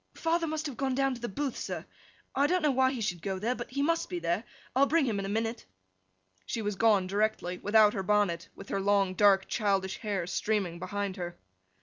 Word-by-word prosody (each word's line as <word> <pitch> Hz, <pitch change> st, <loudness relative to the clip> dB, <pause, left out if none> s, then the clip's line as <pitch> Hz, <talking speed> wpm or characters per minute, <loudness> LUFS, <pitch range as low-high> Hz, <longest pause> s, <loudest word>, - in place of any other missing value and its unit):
'Father 330 Hz, 0 st, 0 dB
must 310 Hz, 0 st, -3 dB
have 280 Hz, -5 st, -5 dB
gone 265 Hz, -2 st, 0 dB
down 270 Hz, 0 st, +2 dB
to 240 Hz, -, -8 dB
the 240 Hz, -, -3 dB
Booth, 275 Hz, +5 st, -2 dB
sir. -, -, -5 dB, 0.5 s
I 280 Hz, +2 st, +3 dB
don't 360 Hz, +1 st, +1 dB
know 300 Hz, -, +4 dB
why 260 Hz, 0 st, +3 dB
he 255 Hz, -4 st, -4 dB
should 180 Hz, -6 st, -2 dB
go 190 Hz, 0 st, -2 dB
there, 225 Hz, +6 st, 0 dB
but 240 Hz, -1 st, -7 dB
he 280 Hz, +2 st, -1 dB
must 330 Hz, +2 st, +1 dB
be 180 Hz, -, -3 dB
there; 170 Hz, +6 st, -1 dB, 0.3 s
I'll 275 Hz, +2 st, +5 dB
bring 320 Hz, -1 st, +3 dB
him 220 Hz, -5 st, -1 dB
in 195 Hz, -, -3 dB
a -, -, -4 dB
minute!' 225 Hz, +2 st, -2 dB, 0.8 s
She 225 Hz, -, -2 dB
was 210 Hz, 0 st, -1 dB
gone 205 Hz, -2 st, +4 dB
directly, 195 Hz, -2 st, -1 dB
without 210 Hz, 0 st, +5 dB
her 195 Hz, -, -2 dB
bonnet; 190 Hz, -4 st, +1 dB
with 195 Hz, -, -11 dB
her 195 Hz, -, -1 dB
long, 195 Hz, -1 st, +2 dB
dark, 195 Hz, -1 st, +4 dB
childish 195 Hz, -3 st, 0 dB
hair 200 Hz, -5 st, -2 dB
streaming 185 Hz, -2 st, -1 dB
behind 200 Hz, +1 st, -3 dB
her. 175 Hz, -1 st, -5 dB
210 Hz, 225 wpm, -30 LUFS, 195-260 Hz, 0.8 s, I'll